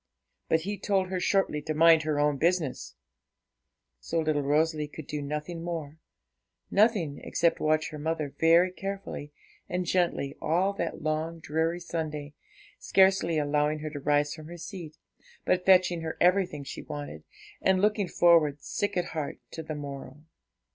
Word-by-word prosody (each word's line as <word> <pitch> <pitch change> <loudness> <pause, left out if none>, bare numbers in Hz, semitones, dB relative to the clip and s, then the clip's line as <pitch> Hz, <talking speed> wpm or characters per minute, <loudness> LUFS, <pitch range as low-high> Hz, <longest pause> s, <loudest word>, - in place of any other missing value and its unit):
But 160 - +3
he 200 +3 -4
told 195 -2 0
her 185 -1 -2
shortly 185 -5 +1
to 155 0 -3
mind 165 0 +6
her 155 -1 -1
own 145 -1 +2
business; 165 -2 0 1.0
so 165 - -2
little 155 -2 +1
Rosalie 150 +2 +1
could 150 0 -9
do 150 +1 -4
nothing 150 +4 -4
more 160 -3 -5 0.7
nothing, 200 -9 +2
except 170 -1 +1
watch 155 0 +1
her 150 - -7
mother 155 -2 -2
very 170 +3 +5
carefully 195 -6 -6 0.4
and 180 0 -1
gently 170 -6 0
all 180 +5 +1
that 195 - -4
long, 155 +2 -1
dreary 160 +2 -1
Sunday, 155 -4 -4 0.5
scarcely 190 -4 +3
allowing 150 +1 +1
her 155 0 -5
to 145 - -6
rise 145 +1 +1
from 155 -1 -10
her 175 +1 -9
seat, 170 -3 -8 0.5
but 180 0 +1
fetching 180 -2 +5
her 160 0 -5
everything 180 -5 +2
she 135 - -7
wanted, 145 - -7 0.4
and 190 -1 +3
looking 210 -1 +2
forward, 165 -4 +4
sick 205 -2 -2
at 175 - +1
heart, 155 -3 -3
to 160 - -6
the 155 -1 -5
morrow. 140 0 -8
160 Hz, 155 wpm, -28 LUFS, 150-180 Hz, 1.0 s, mind